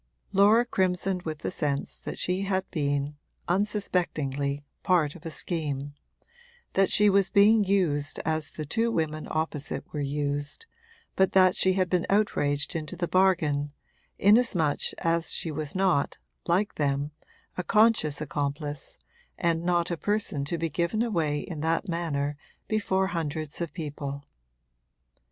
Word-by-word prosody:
Laura 210 +5 +5
crimsoned 185 -3 0
with 155 -1 -3
the - - 0
sense 145 -5 -2
that - - -6
she 180 +1 -1
had 190 -1 -1
been, 145 -2 -1 0.3
unsuspectingly, 155 -8 -1 0.2
part 165 -6 +2
of 170 -1 -9
a - - -3
scheme, 145 -4 -2 0.8
that 195 0 +3
she 210 - +5
was 200 -1 +4
being 210 +2 +5
used 170 -8 +1
as 155 -1 0
the 155 - -6
two 225 +9 +1
women 155 -4 -2
opposite 155 -2 -2
were 150 - -3
used, 145 - -2 0.5
but 190 0 +3
that 185 -1 +5
she 185 - +4
had 185 -1 +1
been 175 -1 0
outraged 150 -9 +1
into 160 +2 -4
the 175 0 -2
bargain, 155 -7 +2 0.4
inasmuch 200 -8 +3
as 165 0 0
she 165 - -1
was 150 0 -4
not, 185 -6 +1 0.3
like 185 +5 +2
them, 145 0 -1 0.4
a - - -1
conscious 210 -8 +3
accomplice 145 0 -3 0.4
and 170 -1 +1
not 175 0 +1
a 170 - -1
person 205 -7 -1
to 160 +4 -2
be 165 0 -1
given 170 +8 0
away 160 -10 0
in 170 -5 -6
that 165 +5 0
manner 150 -4 -2 0.3
before 190 -3 +1
hundreds 155 -3 -3
of 170 -3 -2
people. 145 -3 -5
165 Hz, 140 wpm, -27 LUFS, 145-190 Hz, 0.8 s, Laura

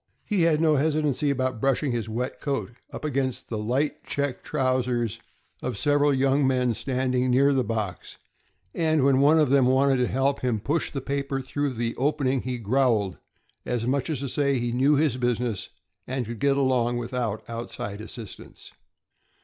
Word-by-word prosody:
He 205 -4 0
had 165 -2 +3
no 155 -2 +3
hesitancy 150 -1 +1
about 130 -4 -1
brushing 135 +1 +1
his 115 -2 -2
wet 125 +4 -3
coat 135 -9 -2 0.2
up - - -6
against 135 -3 -2
the 110 - -3
light 125 +7 -1
check 140 -2 -2
trousers 130 -5 0 0.4
of - - -3
several 145 +4 +3
young 135 +1 +2
men 125 -2 +2
standing 130 +1 0
near 140 +3 +4
the 130 -2 +2
box, 105 -5 -4 0.6
and 155 -3 +2
when 135 -1 +4
one 145 +3 +5
of 150 -4 +3
them 135 -2 +5
wanted 135 +1 +3
to 125 -1 +1
help 135 +2 +1
him 120 -4 0
push 150 +10 -1
the 135 - -4
paper 140 +1 -2
through 140 +1 -2
the 115 0 -2
opening, 135 -2 +1
he 125 -1 -3
growled, 115 -4 +1 0.4
as 120 -2 -2
much 135 +3 0
as 145 -5 -2
to 140 - -2
say 140 +1 +1
he 120 0 -1
knew 135 +5 +3
his 145 -4 +2
business, 120 -4 -1 0.4
and 130 -1 -2
could 115 0 -7
get 140 -1 +2
along 125 -3 +2
without 120 -3 -3
outside 115 -3 -5
assistance. 110 -1 -10
130 Hz, 175 wpm, -25 LUFS, 120-140 Hz, 0.6 s, one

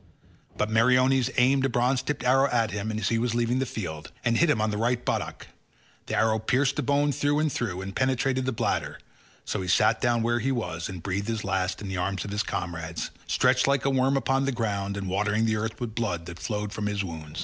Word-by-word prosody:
But 105 +1 0
Meriones 125 +3 +4
aimed 135 +2 +4
a 135 - +2
bronze 125 +1 +1
tipped 145 0 -3
arrow 135 +2 +4
at 115 -3 +1
him 105 +1 -3
as 110 -2 -1
he 115 - +1
was 120 0 0
leaving 120 +2 +1
the 135 - -1
field, 80 -9 -6
and 120 -1 +3
hit 170 +6 +3
him 130 - +3
on 110 0 +1
the 105 - -2
right 120 +1 0
buttock; - - -2 0.6
the - - -1
arrow 110 0 +3
pierced 135 +5 +1
the - - +1
bone 145 +1 +2
through 145 +1 +1
and 155 0 +1
through, 95 -6 -2
and 95 0 -7
penetrated 130 0 +1
the - - +2
bladder, 115 - -1 0.5
so - - -2
he 90 - -4
sat 110 +4 +3
down 120 -1 +2
where 120 +1 +1
he 135 +3 0
was 90 -9 -3
and 90 -3 -7
breathed 100 +2 -2
his 115 -2 -2
last 95 0 -1
in - - -5
the 95 -1 -3
arms 95 +1 -2
of 100 - -6
his 105 +1 0
comrades, 85 -5 -4 0.2
stretched - - +3
like 140 -2 +2
a 140 - +3
worm 135 +1 +2
upon 135 0 +1
the 140 - +1
ground 100 -4 -2
and 100 -1 -4
watering 105 +4 +1
the 110 -1 +1
earth 110 +1 -3
with 120 -3 -3
the 115 +2 -4
blood 85 -7 -2
that 85 -1 -9
flowed 105 0 -3
from 105 -1 -2
his 100 -1 -1
wound. 80 -4 -7
115 Hz, 240 wpm, -27 LUFS, 100-130 Hz, 0.6 s, Meriones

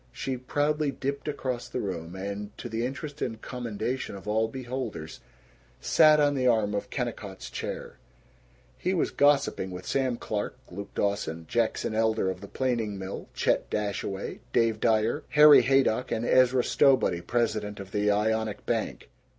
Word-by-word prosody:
She 135 - -3
proudly 145 +4 0
dipped 140 +1 -4
across 130 -4 -3
the 125 - -4
room 90 -5 -4
and, 100 +2 -5
to - - -6
the 115 0 -2
interest 145 +3 -5
and 115 -3 -2
commendation 120 -1 -4
of 100 +1 -10
all 110 +1 +2
beholders, 120 -8 -5 0.6
sat 155 -1 +5
on 145 -1 +4
the 130 -2 +1
arm 110 -4 +2
of 100 - -3
Kennicott's 110 -6 -5
chair. - - -5 0.8
He 185 +1 0
was 170 - +1
gossiping 140 -9 +2
with 90 0 -8
Sam 130 -3 0
Clark, 105 -3 -3
Luke 100 +3 -7
Dawson, 85 -5 -1
Jackson 115 -2 0
Elder 110 -3 +1
of 90 0 -8
the 100 - -8
planing 115 -4 -1
mill, 95 0 -6
Chet - - +1
Dashaway, 100 -2 -3
Dave 115 -2 +2
Dyer, 115 +5 +2
Harry 150 0 +8
Haydock, 135 -3 +2
and 115 +1 -1
Ezra 130 0 +4
Stowbody, 130 -11 +3
president 110 -2 -1
of 95 -1 -9
the 105 0 +1
Ionic 110 0 0
bank. - - -2
115 Hz, 155 wpm, -28 LUFS, 105-130 Hz, 0.8 s, Harry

